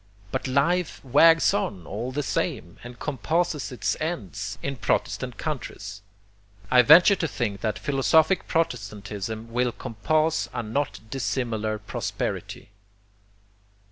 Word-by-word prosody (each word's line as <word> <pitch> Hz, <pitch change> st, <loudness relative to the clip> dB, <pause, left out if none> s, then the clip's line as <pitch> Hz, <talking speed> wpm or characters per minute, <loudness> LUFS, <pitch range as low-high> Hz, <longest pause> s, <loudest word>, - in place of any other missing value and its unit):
But -, -, -2 dB
life 150 Hz, +7 st, +1 dB
wags 160 Hz, +5 st, +6 dB
on, 95 Hz, -4 st, -2 dB
all 115 Hz, +6 st, -4 dB
the 145 Hz, +3 st, -2 dB
same, 85 Hz, -8 st, -2 dB
and 120 Hz, 0 st, -10 dB
compasses 155 Hz, +1 st, -1 dB
its 125 Hz, -, -1 dB
ends, 105 Hz, -, -4 dB
in 140 Hz, -1 st, -3 dB
protestant 125 Hz, 0 st, -1 dB
countries. 105 Hz, -9 st, -5 dB, 0.7 s
I 125 Hz, -, +8 dB
venture 170 Hz, -, +8 dB
to 170 Hz, -, -1 dB
think 105 Hz, -8 st, -3 dB
that 110 Hz, -2 st, -1 dB
philosophic 155 Hz, +5 st, +2 dB
protestantism 110 Hz, -, -3 dB
will 125 Hz, 0 st, +1 dB
compass 155 Hz, +8 st, 0 dB
a 120 Hz, -, -2 dB
not 130 Hz, +6 st, -2 dB
dissimilar 115 Hz, -5 st, -1 dB
prosperity. 105 Hz, -1 st, -4 dB
125 Hz, 115 wpm, -25 LUFS, 110-155 Hz, 0.7 s, I